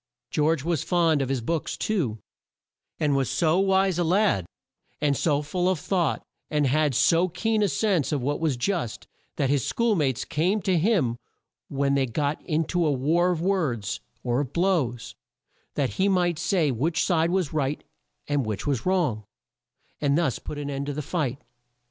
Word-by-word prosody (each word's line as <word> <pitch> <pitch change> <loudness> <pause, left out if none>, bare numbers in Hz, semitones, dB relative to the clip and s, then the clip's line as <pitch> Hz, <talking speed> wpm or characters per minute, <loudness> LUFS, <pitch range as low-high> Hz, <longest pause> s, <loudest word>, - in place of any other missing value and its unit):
George 150 -1 +1
was 165 -1 0
fond 165 -5 +2
of 135 - -2
his 135 -3 -1
books 160 +7 -2
too, 160 - -1 0.8
and 145 -2 +2
was 135 -2 +1
so 160 +6 +2
wise 190 -2 +2
a - - +3
lad, 175 - +2 0.5
and 145 -2 +2
so 145 0 +1
full 180 +5 0
of 185 - +1
thought, 170 -4 0 0.3
and 150 -1 +1
had 145 0 +2
so 170 +8 +4
keen 220 +5 0
a 205 - +3
sense 190 -6 +1
of 145 - 0
what 145 +3 -1
was 155 -6 0
just, 160 - -2 0.3
that 135 -1 0
his 140 -4 +1
school 230 -2 +1
mates 135 - 0
came 180 +8 +1
to 190 -3 +2
him 165 - +2 0.5
when 140 0 0
they 135 -1 +2
got 145 +5 -1
in 160 -1 0
to 175 +2 0
a 155 - +2
war 160 +7 +2
of 175 -3 -1
words, 140 - -1 0.2
or 120 0 0
of 145 -4 -3
blows, 165 - 0 0.6
that 135 -6 0
he 195 +1 +3
might 175 -4 +1
say 165 -7 +1
which 160 +7 0
side 165 -2 +2
was 180 -4 0
right 145 -1 -1 0.4
and 145 -2 +1
which 110 -3 -4
was 140 0 -1
wrong, 160 - +1 0.8
and 145 0 +2
thus 160 -7 0
put 150 - -7
an 145 -1 -4
end 140 0 -3
to 145 - -2
the 150 +1 -4
fight. 140 -5 -2
155 Hz, 185 wpm, -25 LUFS, 135-180 Hz, 0.8 s, so